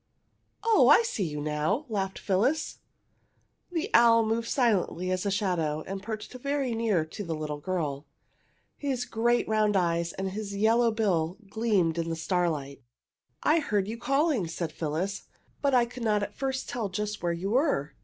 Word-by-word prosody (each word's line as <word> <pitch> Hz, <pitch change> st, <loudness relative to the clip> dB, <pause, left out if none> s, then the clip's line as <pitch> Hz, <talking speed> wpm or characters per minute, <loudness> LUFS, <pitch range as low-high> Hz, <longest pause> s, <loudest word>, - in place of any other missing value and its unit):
"Oh, 455 Hz, -1 st, +5 dB
I -, -, +7 dB
see 230 Hz, -, -2 dB
you 150 Hz, -2 st, -4 dB
now!" 155 Hz, -, -1 dB
laughed 195 Hz, -4 st, -2 dB
Phyllis. 250 Hz, +12 st, 0 dB, 0.9 s
The 355 Hz, +4 st, -2 dB
owl 230 Hz, -1 st, +6 dB
moved 225 Hz, +1 st, -1 dB
silently 195 Hz, -8 st, +1 dB
as 185 Hz, +2 st, -1 dB
a -, -, +2 dB
shadow 175 Hz, -7 st, 0 dB
and 195 Hz, 0 st, -5 dB
perched 215 Hz, +3 st, -6 dB
very 275 Hz, 0 st, -1 dB
near 220 Hz, -8 st, +1 dB
to 180 Hz, +6 st, -7 dB
the 165 Hz, -3 st, -3 dB
little 150 Hz, -1 st, -4 dB
girl. 150 Hz, -4 st, -3 dB, 0.7 s
His 265 Hz, -4 st, -2 dB
great 240 Hz, +2 st, +1 dB
round 215 Hz, -2 st, +2 dB
eyes 170 Hz, -1 st, +1 dB
and 190 Hz, 0 st, -3 dB
his 200 Hz, 0 st, -5 dB
yellow 225 Hz, +3 st, +3 dB
bill 190 Hz, -6 st, 0 dB
gleamed 200 Hz, -8 st, +1 dB
in 165 Hz, 0 st, -2 dB
the 165 Hz, -, -1 dB
starlight. 160 Hz, -5 st, -1 dB, 0.6 s
"I 315 Hz, +2 st, +4 dB
heard 210 Hz, -9 st, 0 dB
you 225 Hz, +2 st, -5 dB
calling!" 275 Hz, -, +1 dB
said 165 Hz, 0 st, -4 dB
Phyllis. 165 Hz, +6 st, -3 dB, 0.3 s
"But 280 Hz, -2 st, +2 dB
I 245 Hz, -1 st, +5 dB
could 245 Hz, 0 st, -8 dB
not 210 Hz, -2 st, +2 dB
at 205 Hz, -, -6 dB
first 265 Hz, -1 st, -2 dB
tell 225 Hz, -5 st, -3 dB
just 210 Hz, +2 st, -3 dB
where 175 Hz, -, 0 dB
you 185 Hz, +4 st, -3 dB
were. 235 Hz, -, +1 dB
205 Hz, 170 wpm, -28 LUFS, 170-235 Hz, 0.9 s, I